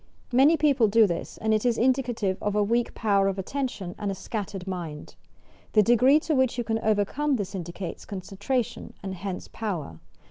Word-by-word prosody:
Many 280 +6 +6
people 280 -6 +4
do 220 +2 +5
this, 170 -4 -4
and 220 0 +1
it 215 - +1
is 240 -2 +2
indicative 240 -6 +1
of 205 0 -1
a 210 - +3
weak 235 +3 0
power 200 -3 +2
of 195 0 -1
attention 195 -3 -3
and 205 -2 -2
a 195 - -2
scattered 195 -2 -5
mind. 170 -6 -6 0.6
The 215 - +6
degree 250 +6 +5
to 315 - -1
which 260 -3 +2
you 240 - 0
can 225 -1 -1
overcome 220 +8 +1
this 200 -4 -4
indicates 175 0 -6
concentration, 200 +5 -3
and 190 -1 -4
hence 185 0 -5
power. 170 - -5
210 Hz, 180 wpm, -26 LUFS, 190-245 Hz, 0.6 s, Many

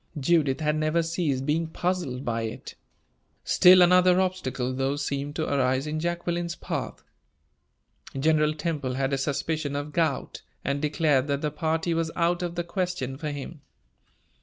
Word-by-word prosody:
Judith 145 -1 +2
had 150 0 +1
never 155 +2 +1
ceased 160 -5 -1
being 160 +3 0
puzzled 165 -6 -2
by 115 -1 -1
it. 110 -1 -6 0.7
Still 180 0 +7
another 180 +1 +5
obstacle, 135 -9 -1
though, 135 +2 0
seemed 145 0 -3
to - - -1
arise 130 -1 +1
in 155 +1 -3
Jacqueline's 175 0 -2
path. - - -5 1.2
General 155 +1 +2
Temple 150 -5 -2
had 135 +1 -1
a - - +2
suspicion 145 +1 -2
of 145 +1 -4
gout, 160 -5 -1 0.2
and 140 +1 -1
declared 150 -3 +2
that 140 0 -1
the 150 - -1
party 160 +2 -1
was 165 -1 0
out 175 +1 +1
of 175 -1 -3
the 175 - -1
question 175 -7 -3
for 150 +2 -4
him. 145 +2 -7
155 Hz, 155 wpm, -26 LUFS, 140-170 Hz, 1.2 s, Still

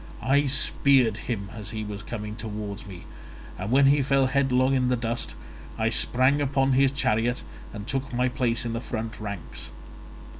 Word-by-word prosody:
I 140 +4 +3
speared 135 -4 +3
him 100 -5 -3
as 105 -2 -7
he 110 -1 -4
was 105 -1 -6
coming 105 -1 -6
towards 105 -2 -6
me, 90 -3 -9 0.6
and 95 +3 -3
when 135 +3 +5
he 140 +1 +5
fell 135 0 +3
headlong 130 0 +2
in 130 -1 +2
the 125 - +3
dust, 115 0 -3 0.4
I 110 0 +1
sprang 130 +5 +3
upon 135 -1 +2
his 135 +1 +5
chariot 120 -3 0 0.3
and 105 -1 -7
took 135 +2 -3
my 125 +1 +1
place 125 -1 0
in 115 - -2
the 115 - -3
front 115 -2 -5
ranks. 100 -5 -6
120 Hz, 175 wpm, -26 LUFS, 110-135 Hz, 0.6 s, when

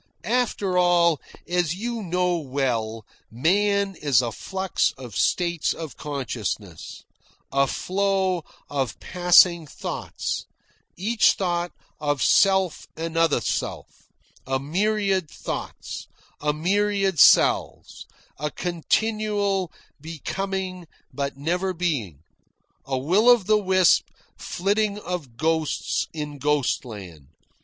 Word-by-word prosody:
"After 210 -7 +1
all, 170 -3 +4 0.3
as 175 -2 0
you 235 +3 -3
know 180 -1 0
well, 125 -7 -2 0.2
man 200 - +1
is 145 -7 +2
a 120 -2 0
flux 190 - -1
of 125 -4 -9
states 170 -3 +1
of 160 -4 -7
consciousness, 115 - -5 0.5
a 140 0 +3
flow 190 0 0 0.2
of 135 -5 -2
passing 175 -2 +4
thoughts, - - -4 0.5
each 220 +3 +3
thought 175 -2 -1 0.3
of 145 -2 0
self 190 -3 +3
another 165 -3 +1
self, - - -4 0.4
a 135 0 0
myriad 190 +3 0
thoughts, - - -6 0.3
a 150 0 +2
myriad 195 +2 +1
selves, - - +4 0.3
a 150 +1 -1
continual 200 +3 -1 0.3
becoming 185 +3 -4 0.3
but 140 -1 -3
never 180 +6 -1
being, 125 - -2 0.6
a 135 -1 -1
will 185 - +3
of 240 -6 +6
the 215 +1 +4
wisp 185 -3 +4 0.3
flitting 205 +2 -1
of 170 - -6
ghosts 160 +1 0
in 150 -2 -6
ghostland. 110 - -2
175 Hz, 100 wpm, -24 LUFS, 145-195 Hz, 0.6 s, of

